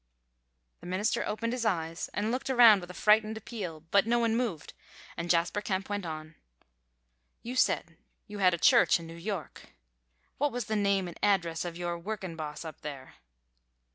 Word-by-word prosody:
The 175 - -11
minister 185 +4 0
opened 230 +3 -2
his 250 -2 -2
eyes 165 -6 -1
and 210 +2 -1
looked 255 +2 -3
around 235 -6 +7
with 175 - -10
a - - -8
frightened 215 +3 +3
appeal, 195 -8 -6
but 200 +2 +4
no 240 +1 +3
one 230 -1 +2
moved, 225 -11 -2 0.4
and 170 +1 -5
Jasper 170 +4 +2
Kemp 195 -1 -2
went 205 -3 -3
on: 155 0 -7 1.1
"You 245 +2 -5
say - - +3 0.4
you 210 -1 -8
had 185 -2 +4
a - - -6
church 235 - +5
in 165 - -9
New 165 - -9
York. 180 - -6 0.6
What 290 +1 +2
was 245 -2 -3
the 220 - -2
name 200 -2 +1
and 175 - -10
address 175 -5 +1
of 170 -1 -5
your 175 -1 -3
workin' 190 -2 -5
boss 155 0 -6
up 160 - -9
there?" 140 -3 -8
195 Hz, 180 wpm, -29 LUFS, 170-220 Hz, 1.1 s, around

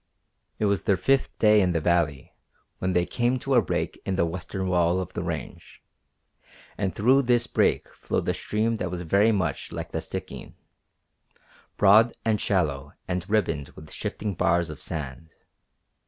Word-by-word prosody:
It 110 - 0
was 100 -2 0
their 100 -4 +3
fifth 135 +8 +1
day 105 -1 +5
in 90 -2 +1
the 85 - +1
valley 80 -4 0 0.5
when 95 0 -1
they 90 -1 +2
came 120 +4 0
to 135 +2 -2
a 120 - +6
break - - -3
in 95 - -2
the 85 - +2
western 95 +3 -4
wall 90 0 +2
of 90 - -5
the - - -3
range, - - -6 1.0
and 95 -2 -2
through 130 +6 +4
this 120 -2 +2
break - - +1
flowed - - -3
a - - +2
stream 110 +2 -1
that 90 - -3
was 90 0 -4
very 100 +7 +3
much 90 -9 -2
like - - -6
the - - -2
Stikine, - - -7 1.2
broad 105 +4 +6
and 110 -2 +1
shallow 75 -7 -1
and 90 0 -3
ribboned 80 -10 0
with 75 0 -12
shifting 105 -2 -4
bars 85 -1 +1
of 75 0 -10
sand. 75 -2 -6
95 Hz, 170 wpm, -26 LUFS, 85-110 Hz, 1.2 s, a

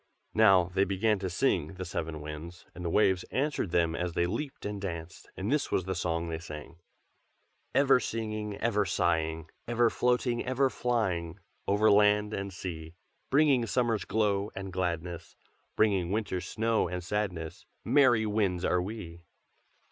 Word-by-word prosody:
Now 95 -5 +5
they 95 - +3
began 100 +2 +1
to 95 -1 -3
sing, 85 0 0
the 95 +1 -5
seven 80 -3 -4
Winds, 75 +3 -8
and 90 - -8
the 85 - -1
waves 95 -1 +3
answered 140 - -1
them 85 -1 +1
as 90 0 -2
they 85 - +1
leaped 120 +10 -4
and 100 -1 -4
danced. 85 -2 -6
And 100 +6 -2
this 150 -1 0
is 95 - +1
the 95 +1 -2
song 85 -1 -1
they 80 -1 -3
sang: 80 0 -9 1.0
"Ever 135 -2 +5
singing, 110 -3 -4
ever 105 -3 +1
sighing, 80 -3 0 0.2
Ever 120 0 +3
floating, 125 -1 +1
ever 130 +1 +1
flying 95 -9 -1 0.3
Over 105 +2 +4
land 105 +1 +4
and 100 0 -3
sea. 85 -3 -7 0.3
Bringing 135 -4 +4
summer's 115 -2 +1
glow 105 -2 +1
and 95 -1 -6
gladness, 85 -2 -3 0.4
Bringing 100 -5 +2
winter's 100 -4 -2
snow 115 0 +1
and 90 +1 -4
sadness, 90 -5 -3 0.2
Merry 120 -3 +4
winds 100 -4 0
are 90 - +2
we! 90 -4 -7
95 Hz, 155 wpm, -29 LUFS, 85-110 Hz, 1.0 s, Now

